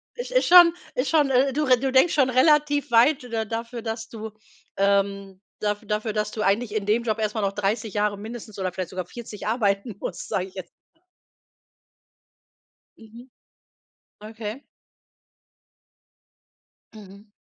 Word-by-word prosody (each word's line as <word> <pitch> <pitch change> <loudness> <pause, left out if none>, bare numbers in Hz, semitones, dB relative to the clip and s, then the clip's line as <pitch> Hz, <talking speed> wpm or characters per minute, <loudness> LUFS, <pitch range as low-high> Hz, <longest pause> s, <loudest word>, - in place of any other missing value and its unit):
Is - - -6
ist - - +2
schon 345 -1 +8 0.2
ist 255 +3 -1
schon, 300 -4 +3
äh, 265 +1 +2
du 300 +2 0
re 255 -3 +4
denkst 265 +6 +4
schon 270 -3 +3
relativ 290 +1 +3
weit 250 +4 +4
da 220 -1 -1
dafür, 230 +2 -5
dass 225 0 -5
du, 220 -1 -8 0.5
ähm 200 -1 0 0.2
dafür, 210 +1 -2
dass 210 -1 -1
du 215 0 -4
eigentlich 210 +3 +1
in 205 -2 -1
dem 220 +3 +2
Job 220 -2 -1
erst 215 -1 -1
mal 220 - -2
noch 195 -1 0
30 210 +1 -2
Jahre 205 0 +1
mindestens 215 0 -9
oder 185 -1 -2
vielleicht 185 -1 -5
sogar 185 -1 -5
40 220 -4 -8
arbeiten 210 -2 0
musst, - - -6
sage 185 -1 -1
ich 190 - -14
jetzt. 185 - -8 2.3
Mhm, 230 +3 -14 0.9
okay. 220 +4 -7 2.3
Mhm. 205 0 -14
220 Hz, 145 wpm, -24 LUFS, 205-250 Hz, 2.3 s, schon